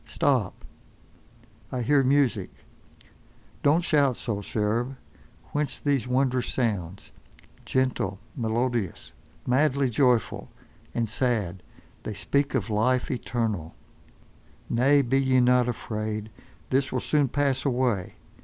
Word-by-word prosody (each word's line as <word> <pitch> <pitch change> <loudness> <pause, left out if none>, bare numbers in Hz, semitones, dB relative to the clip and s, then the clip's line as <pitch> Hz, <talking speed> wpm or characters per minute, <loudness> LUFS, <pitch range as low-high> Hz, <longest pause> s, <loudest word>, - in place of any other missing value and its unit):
Stop! - - 0 1.1
I 125 -1 -2
hear 140 +3 +4
music. 130 -8 +2 1.1
Don't 155 +5 +3
shout 140 -6 +3
so, 105 -4 -3
cherub. 115 +6 -1 0.6
Whence 145 -2 -2
these 140 -4 0
wondrous 130 0 +1
sounds? 100 -7 -2 0.5
Gentle, 130 -7 0 0.2
melodious, 115 -3 -2 0.3
madly 135 0 +2
joyful, 125 0 +1 0.5
and 115 -1 0
sad, 105 -6 -1 0.4
they 110 - -5
speak 140 +6 0
of 110 -4 -1
life 120 +4 +1
eternal—— 110 -8 -2 1.0
Nay, 140 +4 +4
be 135 +2 +2
ye 130 -1 +3
not 125 0 +4
afraid. 110 -2 -4 0.4
This 135 +1 +1
will 130 - 0
soon 145 +2 +2
pass 140 0 0
away. 120 -8 0
125 Hz, 105 wpm, -26 LUFS, 110-135 Hz, 1.1 s, hear